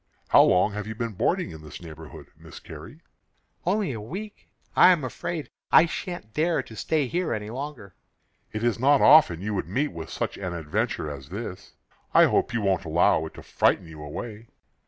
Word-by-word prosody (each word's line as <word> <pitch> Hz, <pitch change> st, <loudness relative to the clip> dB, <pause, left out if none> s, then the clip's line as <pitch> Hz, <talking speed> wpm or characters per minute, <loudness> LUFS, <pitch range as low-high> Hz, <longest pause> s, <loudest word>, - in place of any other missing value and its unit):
"How -, -, +7 dB
long 90 Hz, +3 st, +4 dB
have 105 Hz, 0 st, -5 dB
you 110 Hz, -, -5 dB
been 115 Hz, 0 st, -3 dB
boarding -, -, 0 dB
in 80 Hz, -1 st, -10 dB
this 75 Hz, -1 st, -10 dB
neighborhood, 80 Hz, -2 st, -11 dB
Miss -, -, -12 dB
Carrie?" -, -, -11 dB, 0.7 s
"Only 195 Hz, -3 st, +1 dB
a 115 Hz, -4 st, -5 dB
week. 195 Hz, -, -8 dB, 0.3 s
I -, -, +8 dB
am 170 Hz, -6 st, +1 dB
afraid 155 Hz, +5 st, -5 dB, 0.2 s
I -, -, +8 dB
shan't 170 Hz, -, -6 dB
dare 160 Hz, +4 st, +1 dB
to 110 Hz, -, -12 dB
stay 150 Hz, +6 st, 0 dB
here 170 Hz, 0 st, -1 dB
any 105 Hz, 0 st, -6 dB
longer." 130 Hz, -6 st, -7 dB, 0.6 s
"It 110 Hz, +1 st, -4 dB
is 120 Hz, -1 st, +1 dB
not 140 Hz, +3 st, +5 dB
often 135 Hz, -, +6 dB
you 105 Hz, +1 st, -2 dB
would 100 Hz, -, -2 dB
meet 135 Hz, -, 0 dB
with 80 Hz, -1 st, -8 dB
such -, -, -3 dB
an 90 Hz, -3 st, -4 dB
adventure 75 Hz, -1 st, -2 dB
as 70 Hz, -1 st, -9 dB
this. 100 Hz, -1 st, -7 dB, 0.4 s
I -, -, +8 dB
hope -, -, +1 dB
you 115 Hz, -, -1 dB
won't 95 Hz, -2 st, +1 dB
allow 80 Hz, 0 st, +2 dB
it -, -, -14 dB
to -, -, -11 dB
frighten -, -, +1 dB
you 80 Hz, -2 st, -11 dB
away." 105 Hz, +9 st, -7 dB
110 Hz, 195 wpm, -26 LUFS, 85-145 Hz, 0.7 s, I